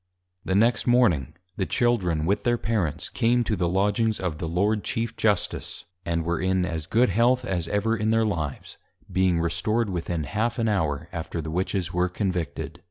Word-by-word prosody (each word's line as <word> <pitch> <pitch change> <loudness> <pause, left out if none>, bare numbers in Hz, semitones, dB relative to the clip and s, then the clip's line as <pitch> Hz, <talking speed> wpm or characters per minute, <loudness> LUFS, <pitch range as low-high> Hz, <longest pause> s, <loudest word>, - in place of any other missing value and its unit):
The 95 - -1
next 115 +3 +3
Morning, 115 - +3 0.2
the 95 - -1
Children 90 -10 +1
with 100 +3 +1
their 120 0 +2
Parents, 100 -10 -1
came 120 0 +2
to 110 - 0
the 85 -2 0
Lodgings 105 +4 +1
of 85 -4 -3
the 80 - -3
Lord 100 +5 +1
Chief 115 -1 -2
Justice, 105 -4 -1 0.2
and 85 -1 0
were 85 -1 -1
in 95 -1 +1
as 80 -3 -4
good 120 +5 +3
health 125 +2 +3
as 90 -7 -2
ever 110 +3 +1
in 110 0 0
their 115 0 +3
Lives; 80 -9 -4 0.3
being 95 -2 +2
Restored 105 +6 0
within 85 -2 -2
half 110 +9 -1
an 115 -2 +1
Hour 80 -7 0
after 85 0 -4
the 80 0 -4
Witches 90 0 -1
were 90 +1 +1
Convicted. 90 -6 -3
95 Hz, 180 wpm, -25 LUFS, 85-115 Hz, 0.3 s, next